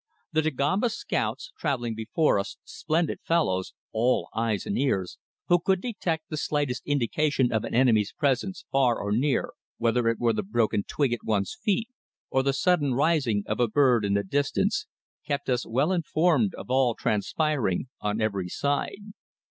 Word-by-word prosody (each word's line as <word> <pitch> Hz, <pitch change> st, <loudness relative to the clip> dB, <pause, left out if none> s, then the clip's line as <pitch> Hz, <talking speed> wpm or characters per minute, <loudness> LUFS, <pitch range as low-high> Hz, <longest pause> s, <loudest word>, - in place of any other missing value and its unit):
The 155 Hz, -1 st, +2 dB
Dagomba 155 Hz, -, +1 dB
scouts, 240 Hz, -, -3 dB
travelling 125 Hz, -7 st, -1 dB
before 110 Hz, +4 st, +1 dB
us, 100 Hz, 0 st, -5 dB
splendid 165 Hz, 0 st, -1 dB
fellows, 120 Hz, -, 0 dB, 0.2 s
all 120 Hz, +3 st, +1 dB
eyes 110 Hz, -2 st, -1 dB
and 100 Hz, -, -2 dB
ears, 95 Hz, -9 st, -1 dB, 0.3 s
who 175 Hz, -, +5 dB
could 190 Hz, +2 st, +1 dB
detect 180 Hz, -8 st, -3 dB
the 155 Hz, -, -5 dB
slightest 145 Hz, -4 st, -1 dB
indication 145 Hz, 0 st, +1 dB
of 110 Hz, -1 st, 0 dB
an -, -, -4 dB
enemy's 115 Hz, -5 st, +3 dB
presence 145 Hz, +7 st, -1 dB
far 130 Hz, -4 st, +3 dB
or 100 Hz, -, -3 dB
near, 130 Hz, +6 st, +1 dB, 0.3 s
whether 115 Hz, 0 st, +1 dB
it 115 Hz, -1 st, +2 dB
were 120 Hz, -1 st, +2 dB
the 105 Hz, -, -1 dB
broken 110 Hz, 0 st, 0 dB
twig 140 Hz, -5 st, 0 dB
at 120 Hz, -, -4 dB
one's 100 Hz, -3 st, 0 dB
feet 220 Hz, +3 st, 0 dB, 0.4 s
or 130 Hz, -, +3 dB
the 135 Hz, +1 st, +1 dB
sudden 145 Hz, -2 st, +2 dB
rising 135 Hz, -8 st, +2 dB
of 105 Hz, -, -3 dB
a 120 Hz, -, +3 dB
bird 125 Hz, -1 st, +3 dB
in 100 Hz, 0 st, +1 dB
the 100 Hz, -, +1 dB
distance, 140 Hz, +8 st, 0 dB, 0.4 s
kept 140 Hz, -2 st, -2 dB
us 125 Hz, -1 st, 0 dB
well 135 Hz, +9 st, +1 dB
informed 165 Hz, -, +2 dB
of -, -, -8 dB
all 130 Hz, -3 st, +3 dB
transpiring 125 Hz, -, 0 dB
on 105 Hz, +1 st, -1 dB
every 100 Hz, -5 st, -1 dB
side. 145 Hz, -, -2 dB
130 Hz, 165 wpm, -26 LUFS, 110-155 Hz, 0.4 s, who